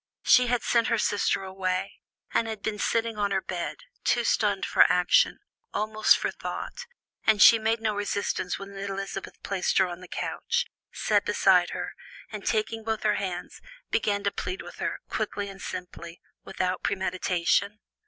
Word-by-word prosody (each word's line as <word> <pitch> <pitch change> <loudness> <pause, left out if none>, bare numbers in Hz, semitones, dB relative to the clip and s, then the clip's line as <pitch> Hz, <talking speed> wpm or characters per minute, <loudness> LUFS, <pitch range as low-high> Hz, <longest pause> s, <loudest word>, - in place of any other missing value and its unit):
She 250 0 +6
had 245 -1 +1
sent 235 -2 +2
her 230 -2 +2
sister 205 -2 +1
away, 185 -1 -3 0.3
and 230 - +2
had 220 -2 -6
been 210 -1 -2
sitting 225 0 0
on 205 -1 +1
her 195 -1 +1
bed, 180 -2 -5 0.2
too - - +2
stunned - - +1
for - - +5
action, - - +4 0.4
almost 215 0 +3
for - - -2
thought, 485 -1 -6 0.4
and 220 -1 +5
she 230 +3 +9
made 225 +1 +1
no 220 -1 0
resistance 200 -2 -2
when 195 0 -9
Elizabeth 195 0 -5
placed 195 -2 0
her 190 - +5
on 175 0 -7
the 180 - -10
couch, - - -2 0.3
sat - - +1
beside - - +4
her, - - -5 0.4
and 210 -2 -6
taking 220 +1 0
both 220 0 -2
her 210 -1 +2
hands, 180 -2 -5 0.3
began 205 -2 +1
to 200 - +1
plead 185 -1 -4
with 175 - -11
her, - - -3
quickly 210 -2 -3
and 195 -1 -11
simply, 180 -2 -7 0.2
without 185 -1 -2
premeditation. 190 +2 0
200 Hz, 165 wpm, -27 LUFS, 190-220 Hz, 0.4 s, she